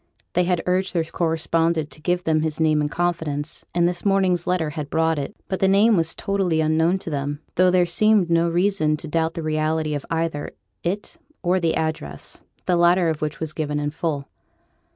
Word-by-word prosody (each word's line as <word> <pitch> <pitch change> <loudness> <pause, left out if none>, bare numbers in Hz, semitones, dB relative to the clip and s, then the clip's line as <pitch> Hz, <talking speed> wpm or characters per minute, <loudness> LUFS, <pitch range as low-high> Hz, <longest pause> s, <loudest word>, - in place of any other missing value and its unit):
They 180 0 +2
had 175 -2 0
urged 185 +1 0
their 165 - +2
correspondent 165 -1 0
to 155 - -10
give 175 +2 0
them 155 -2 +2
his 155 0 -2
name 155 -1 +3
in 150 - 0
confidence, 160 -3 -2
and 175 0 +4
this 175 0 -3
morning's 190 -3 +2
letter 175 -4 0
had 145 -1 -5
brought 160 -1 +1
it; 140 +9 -5
but 190 - -2
the 190 - +3
name 205 +4 +5
was 165 -2 +1
totally 195 -5 0
unknown 160 +3 +2
to 165 - -4
them, 145 +1 -3
though 185 +1 +4
there 180 -1 +4
seemed 205 +2 +3
no 170 0 +2
reason 175 -3 +1
to 155 - -7
doubt 160 +1 0
the 165 - -4
reality 155 0 0
of 145 -2 -3
either 165 -3 -2 0.3
it 200 - -3 0.3
or 180 +1 +2
the 165 -2 +1
address, 115 - -3 0.2
the 180 - +2
latter 175 0 +4
of 155 -1 -3
which 150 -1 -3
was 160 -1 -4
given 150 -2 -2
in 145 0 -2
full. 150 -3 -3
165 Hz, 200 wpm, -23 LUFS, 155-180 Hz, 0.3 s, name